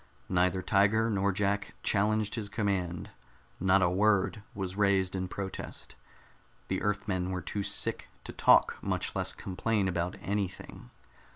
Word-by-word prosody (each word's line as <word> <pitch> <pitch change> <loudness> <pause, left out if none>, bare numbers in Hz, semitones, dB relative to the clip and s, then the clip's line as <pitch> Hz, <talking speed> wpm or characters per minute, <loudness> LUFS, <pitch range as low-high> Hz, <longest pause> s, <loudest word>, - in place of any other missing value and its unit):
Neither 90 +1 +2
Tiger 105 +4 +3
nor 100 -1 +2
Jack 100 +1 -1
challenged 105 +1 +1
his 110 -4 -3
command; 95 -5 -2 0.5
not 95 0 +4
a 85 - +4
word 100 +2 +2
was 95 -2 -4
raised 100 -2 +2
in 95 -1 -2
protest. 95 +1 -6 0.8
The - - -1
Earthmen 105 -3 -1
were 90 -2 -3
too 100 - -3
sick 100 0 -1 0.2
to - - -8
talk, - - +5
much - - -2
less - - 0
complain 100 +2 -1
about 90 0 -1
anything. 95 -10 -4
100 Hz, 135 wpm, -30 LUFS, 95-105 Hz, 0.8 s, talk